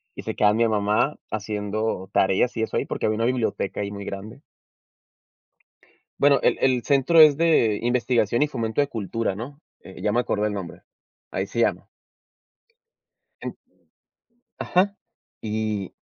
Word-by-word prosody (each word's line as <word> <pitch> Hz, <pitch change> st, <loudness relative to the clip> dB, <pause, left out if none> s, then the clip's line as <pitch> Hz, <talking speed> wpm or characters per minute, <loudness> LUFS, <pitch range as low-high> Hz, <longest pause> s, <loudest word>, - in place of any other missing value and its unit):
y -, -, -8 dB
se -, -, -4 dB
quedaba 105 Hz, 0 st, +4 dB
mi 115 Hz, 0 st, +3 dB
mamá 105 Hz, +6 st, +1 dB
haciendo 105 Hz, -2 st, -3 dB
tareas 95 Hz, +6 st, +2 dB
y 110 Hz, -, 0 dB
eso -, -, -4 dB
ahí, -, -, 0 dB
porque -, -, -3 dB
había 110 Hz, -, +1 dB
una 115 Hz, -, 0 dB
biblioteca 120 Hz, -5 st, -1 dB
ahí 100 Hz, -, -3 dB
muy 100 Hz, 0 st, -7 dB
grande. 100 Hz, +2 st, -8 dB, 1.8 s
Bueno, 140 Hz, -1 st, +5 dB
el -, -, +3 dB
el 130 Hz, -3 st, +2 dB
centro 140 Hz, +4 st, +3 dB
es 155 Hz, -2 st, +8 dB
de 155 Hz, -11 st, +3 dB
Investigación 120 Hz, -1 st, +1 dB
y -, -, +1 dB
fomento 115 Hz, -4 st, -3 dB
de 140 Hz, -, +1 dB
cultura, 115 Hz, -2 st, -3 dB
¿no? 130 Hz, +7 st, -8 dB, 0.2 s
Eh, 95 Hz, -, -12 dB
ya 105 Hz, -, +1 dB
me 120 Hz, -, +2 dB
acordé 105 Hz, -3 st, 0 dB
el 105 Hz, -, -3 dB
nombre. 95 Hz, -4 st, -7 dB, 0.5 s
Ahí 95 Hz, +1 st, -2 dB
se 115 Hz, -, -4 dB
llama. 115 Hz, -, +1 dB, 1.6 s
En -, -, -5 dB, 1.0 s
Ajá, 200 Hz, +3 st, +1 dB, 0.5 s
y 110 Hz, -3 st, -3 dB
110 Hz, 155 wpm, -24 LUFS, 105-125 Hz, 1.8 s, es